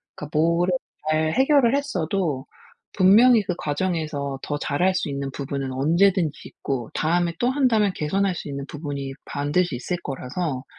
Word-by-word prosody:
그러니까 150 0 -5
뭐를 170 +3 +2 0.4
잘 155 0 +1
해결을 270 -2 +4
했어도 175 - -1 0.5
분명히 220 +5 +6
그 180 - -2
과정에서 150 -4 -2
더 145 - -2
잘 145 +2 -2
할 190 0 +4
수 170 - -1
있는 140 -1 -3
부분은 135 -1 -4
언제든지 165 +4 +2
있고 125 -4 -4
다음에 170 +1 +1
또 245 - +2
한다면 240 -7 +2
개선할 190 +5 0
수 - - -6
있는 140 0 -5
부분이 140 -3 -5
반드시 145 +2 0
있을 175 +9 -3
거라서 135 +1 -4
160 Hz, 335 characters per minute, -23 LUFS, 140-190 Hz, 0.5 s, 분명히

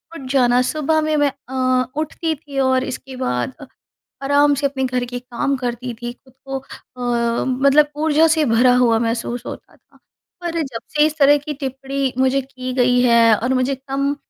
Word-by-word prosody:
उठ 270 -5 -8
जाना 250 -2 +3
सुबह 310 +4 0
में 310 0 0
मैं 290 -1 +2 0.2
अ, 255 -1 +1
उठती 315 +1 -2
थी 285 -2 -7
और 260 -1 +2
इसके 265 0 -7
बाद 250 - -2
अ, - - -8 0.6
आराम 285 +1 +4
से 280 +1 -2
अपने 270 -1 -4
घर 250 -1 -1
के 245 0 -6
काम 250 +3 -2
करती 245 -1 -4
थी, 240 0 -4
खुद 260 +1 -25
को 270 0 -4
अ, 240 -3 -3
मतलब 280 +3 +3
ऊर्जा 315 +1 +4
से 315 -1 +2
भरा 245 +1 +4
हुआ 240 -2 +3
महसूस 235 +1 -2
होता - - -9
था। - - -28 0.4
पर 335 -1 -2
जब 265 -6 -5 0.2
से 300 0 +5
इस 310 0 -2
तरह 290 +1 +6
की 295 +1 -6
टिप्पणी 270 -1 -3
मुझे 265 +1 +2
की 255 -1 -7
गई 250 -1 +3
है 235 -2 +5
और 245 +5 -1
मुझे 255 +1 0
कम 275 +2 -2
265 Hz, 190 wpm, -19 LUFS, 250-285 Hz, 0.6 s, तरह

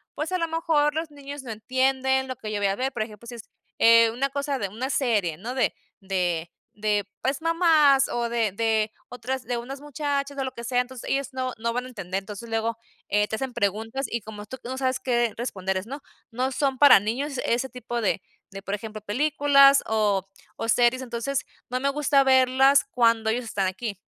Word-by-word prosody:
pues 305 +4 -3
a - - +2
lo 330 - 0
mejor 320 -2 +1
los 320 0 -2
niños 285 0 -8
no 240 - -6
entienden 265 +3 +1
lo 255 - -4
que 215 -1 -6
yo 210 - -2
voy 200 - +2
a 195 - 0
ver, 260 +4 -2
por 230 - -3
ejemplo, 215 0 -11
si 240 - -7
es, 230 - -11 0.3
eh, 230 0 +6
una 265 +4 -1
cosa 280 0 -2
de 200 - -2
una 235 +7 -4
serie, 210 - +1
¿no?, 235 +8 -6
de 260 - +1 0.3
de 175 -3 -1 0.2
de 210 -1 0 0.2
pues, 270 +2 -1
mamás 320 -5 +4
o 235 -1 -1
de 230 -4 0
de 220 0 +1 0.2
otras 255 +1 -4
de 245 - -2
unas 265 +4 -7
muchachas 285 -1 -3
o 270 - -1
lo 260 - -5
que 235 - -8
sea, 245 +1 0
entonces 250 -1 -8
ellos 275 0 -1
no 255 -1 -2
no 230 +1 -2
van 250 +1 -2
a - - -9
entender. 190 -6 -4
Entonces 210 +3 -8
luego, 225 0 -1 0.3
eh, 210 +1 +2
te 220 - -3
hacen 265 0 -4
preguntas 225 +4 -1
y 235 - -2
como 210 0 -9
tú 260 +5 -8
no 260 +2 -4
sabes 260 -1 0
qué 240 -3 +1
responderles 190 -5 -3
¿no? 280 +4 -7 0.3
No, 255 +3 -1
son 270 0 0
para 285 -7 +9
niños 260 +6 -2
ese 240 +3 0
tipo 245 -1 -5
de 200 -2 0 0.3
de, 195 0 -8
por 195 - -4
ejemplo, 215 0 -8
películas 275 +4 +5
o 205 -3 +1 0.4
series. 240 +2 +3
Entonces, 250 +3 -3 0.2
no 250 +1 -1
me 275 - 0
gusta 280 -1 +3
verlas 265 +1 +5
cuando 230 -2 +3
ellos 240 +2 -1
están 200 -3 -1
aquí. 200 +1 -4
245 Hz, 210 wpm, -25 LUFS, 220-270 Hz, 0.4 s, para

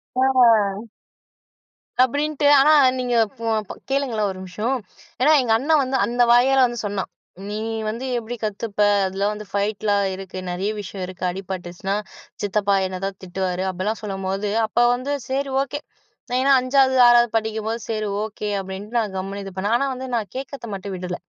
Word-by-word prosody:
ஆ. 230 -5 +3 1.1
அப்டீன்ட்டு. 290 +3 0
ஆனா 305 +3 +6 0.3
நீங்க 245 -1 0 0.2
போ 230 - -6
அப்பொ 210 - -7 0.2
கேளுங்களேன் 250 -7 0
ஒரு 185 - -9
நிமிஷம். 210 +8 -2 0.5
ஏனா 300 +4 +5
எங்கண்ண 245 +5 +1
வந்து 265 +1 -1
அந்த 245 +1 -1
வாயால 260 +2 +5
வந்து 240 -1 -3
சொன்னான். 200 -2 -3 0.4
நீ 210 - -3 0.3
வந்து 230 +4 -4
எப்டி 235 +1 -5
கத்துப்ப. 210 0 -4 0.3
அதில 195 +2 -1
வந்து 210 0 -7
ஃபைட்லா 205 0 0 0.2
இருக்கு. 190 -1 -8
நெறைய 195 +4 -2
விஷயம் 190 -1 -7
இருக்கு. 185 0 -9
அடிபட்டுச்சினா 190 0 -4 0.5
சித்தப்பா 200 0 +1
என்னை 185 - -5
தான் 195 -1 -4
திட்டுவாரு. 185 0 -2
அப்படிலாம் 190 +4 -2
சொல்லும்போது, 195 0 -3 0.2
அப்ப 240 - -1 0.2
வந்து 255 +3 -4 0.2
சேரி 275 +1 -1
ஓகே 290 +2 -5 0.6
ஏன்னா 275 +2 +3
5சாவது 255 +2 0 0.3
6வது 240 0 +7 0.2
படிக்கும்போது 220 +1 -2
சரி 215 -1 -1 0.2
ஓகே. 210 -1 -5
அப்படின்ட்டு 195 +4 -5
நான் 215 -4 0
கம்முனு 195 +2 -4
இது 195 - -7
பண்ணேன். 200 +4 -1
ஆனா 275 - 0
வந்து 255 +1 -6
நான் 210 -5 -2
கேட்கிறத 270 -2 -6
மட்டும் 195 0 -5
விடல. 180 0 -4
215 Hz, 155 wpm, -22 LUFS, 195-245 Hz, 1.1 s, 6வது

